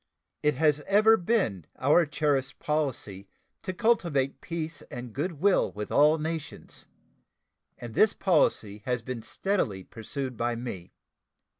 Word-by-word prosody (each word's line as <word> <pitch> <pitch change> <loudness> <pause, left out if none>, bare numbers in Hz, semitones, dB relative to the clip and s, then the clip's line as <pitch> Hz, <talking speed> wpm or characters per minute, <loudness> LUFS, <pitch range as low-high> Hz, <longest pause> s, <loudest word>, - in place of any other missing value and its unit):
It 150 -1 +2
has 150 +1 +3
ever 215 +3 +6
been 175 - 0
our 150 +5 +4
cherished 140 -2 0
policy 130 -10 -2 0.3
to 185 - -4
cultivate 170 - +1
peace 165 -1 -4
and 120 -2 -7
good 160 - -2
will 185 +6 +2
with 105 0 -6
all 150 +2 +5
nations, 160 0 -6 0.9
and 120 -2 -8
this 215 - +4
policy 110 - +1
has 125 -2 -1
been 125 -1 -5
steadily 110 - -1
pursued 125 +5 -6
by 120 +1 0
me. 115 -7 -7
145 Hz, 130 wpm, -28 LUFS, 120-170 Hz, 0.9 s, ever